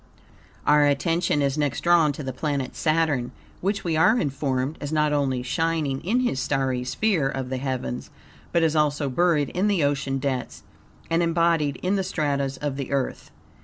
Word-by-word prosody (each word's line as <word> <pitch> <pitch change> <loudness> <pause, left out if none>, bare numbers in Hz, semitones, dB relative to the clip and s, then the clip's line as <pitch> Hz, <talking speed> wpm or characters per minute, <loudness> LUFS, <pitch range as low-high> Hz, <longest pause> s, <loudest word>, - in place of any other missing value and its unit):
Our 150 0 +5
attention 150 +1 +1
is 140 +2 0
next 145 -3 -1
drawn 170 -3 +4
to 150 - -7
the 130 -1 -4
planet 140 -2 -2
Saturn, 155 -6 +1 0.3
which, 200 +2 -1
we 165 -2 0
are 215 +9 +4
informed, 135 - -2
is 145 0 -4
not 150 -1 +2
only 135 -4 0
shining 155 -1 -1
in 230 +8 +1
his 245 - 0
starry 130 -2 0
sphere 145 - +1
of 135 -2 -4
the 130 - -2
heavens, 130 - -4 0.4
but 170 - +2
is 160 -1 +2
also 145 -2 +1
buried 155 -1 +2
in 190 +3 0
the 195 -7 +2
ocean 135 -1 0
depths 130 -2 -3 0.5
and 165 +1 +3
embodied 165 -4 +2
in 190 +2 +1
the 190 - 0
stratas 140 -5 -1
of 145 -2 -3
the 140 -2 -5
earth. 135 -2 -2
145 Hz, 175 wpm, -24 LUFS, 135-165 Hz, 0.5 s, Our